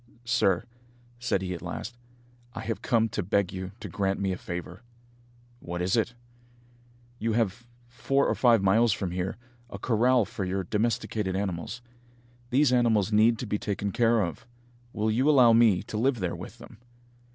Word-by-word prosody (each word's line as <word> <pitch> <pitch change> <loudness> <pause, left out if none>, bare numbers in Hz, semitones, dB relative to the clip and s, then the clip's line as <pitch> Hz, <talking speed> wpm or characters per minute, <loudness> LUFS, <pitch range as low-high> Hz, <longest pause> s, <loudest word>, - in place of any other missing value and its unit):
"Sir," 115 -7 +2 0.6
said 100 -5 -1
he 90 -1 -3
at 85 - -7
last, 120 - -6 0.6
"I 110 - -5
have 110 0 -4
come 115 -2 +2
to 105 - -2
beg 100 0 0
you 95 0 -5
to - - -7
grant 95 +2 -1
me 95 -1 0
a - - -1
favour." 90 +3 -7 0.8
"What 90 -4 -6
is 90 +1 +1
it?" 115 +1 0 1.0
"You 115 0 -1
have, 115 +1 -1 0.2
four 125 +4 0
or - - +1
five 115 -5 +4
miles 110 +3 +4
from 95 -4 -3
here, 90 +1 -3 0.3
a 100 - -7
corral 120 +2 +2
for 110 -1 -5
your 95 +1 -2
domesticated 105 -1 -1
animals. 95 +4 -4 0.7
These 130 +1 +3
animals 115 -4 +2
need 110 +2 +4
to 125 - -5
be 105 -1 -2
taken 100 -1 -3
care 115 0 +3
of. 85 +5 -6 0.4
Will 110 -1 -1
you 130 +7 +2
allow 125 -6 +6
me 115 -5 +4
to 105 - -5
live 130 0 +1
there 90 -3 -2
with - - -9
them?" - - -14
110 Hz, 175 wpm, -27 LUFS, 95-120 Hz, 1.0 s, allow